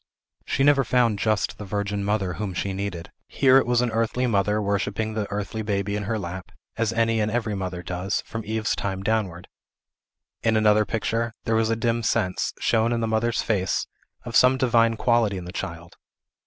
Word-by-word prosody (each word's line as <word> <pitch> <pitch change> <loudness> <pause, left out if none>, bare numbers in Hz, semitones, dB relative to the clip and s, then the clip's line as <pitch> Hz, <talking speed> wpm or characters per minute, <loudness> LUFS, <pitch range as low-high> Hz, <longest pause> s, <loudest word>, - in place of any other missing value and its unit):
She 135 - +1
never 140 -1 +5
found 120 -4 +2
just 110 -1 0
the - - -5
virgin 100 0 -2
mother 100 -3 0
whom 100 -2 -4
she 95 +2 -2
needed. 95 -3 -5 0.2
Here 135 -1 +4
it - - -1
was 120 0 +3
an 125 -1 0
earthly 115 +3 0
mother, 105 -2 +1
worshipping 100 +1 -1
the 105 -2 -3
earthly 105 +2 -3
baby 100 -1 -1
in 105 0 -3
her 110 +2 -1
lap, 90 -2 -6 0.2
as 115 -1 0
any 115 0 +1
and 105 0 +1
every 110 -1 -1
mother 90 -2 -4
does, 90 +3 -2
from 115 0 -6
Eve's 110 0 -1
time 95 -1 -3
downward. 100 -5 -1 0.9
In 110 -1 +2
another 105 0 +4
picture, 115 +1 -1
there 115 - -1
was 110 0 +2
a 115 - +2
dim 115 +1 0
sense, 90 -5 0
shown 115 +1 +2
in 120 - 0
the 115 - 0
mother's 110 +1 0
face, 95 -4 0 0.4
of 120 -1 -5
some 130 +1 +6
divine 115 -3 +3
quality 115 -5 +2
in 90 - -6
the 90 - -7
child. 85 -1 -6
110 Hz, 195 wpm, -24 LUFS, 100-115 Hz, 0.9 s, some